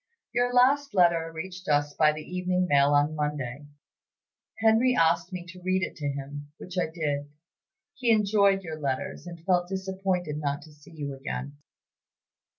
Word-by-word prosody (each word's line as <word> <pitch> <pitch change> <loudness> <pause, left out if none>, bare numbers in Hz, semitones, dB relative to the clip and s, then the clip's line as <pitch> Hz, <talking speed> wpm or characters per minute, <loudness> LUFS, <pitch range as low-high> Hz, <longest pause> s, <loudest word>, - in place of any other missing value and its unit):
"Your 245 0 +2
last 270 +2 +3
letter 170 -3 +3
reached 180 +3 -7
us 145 0 +2
by 155 0 +4
the 155 0 -6
evening 180 +1 -1
mail 140 -1 +4
on 145 +2 +3
Monday. 145 -2 -3 0.9
Henry 225 +3 +4
asked 165 +2 +2
me 180 -2 -6
to 180 +1 -11
read 185 +1 +1
it - - -3
to 150 -3 -3
him, 145 +1 -6
which 180 - -9
I 180 - +1
did. 145 -3 -3 0.6
He 245 -3 -1
enjoyed 200 -3 +4
your 160 -2 -6
letters, 140 +3 -3
and 170 -1 -10
felt 180 -1 +2
disappointed 190 -4 -2
not 145 -1 -2
to 155 - -15
see 150 +4 -18
you 145 -2 -4
again. 135 +1 -5
170 Hz, 160 wpm, -27 LUFS, 145-190 Hz, 0.9 s, by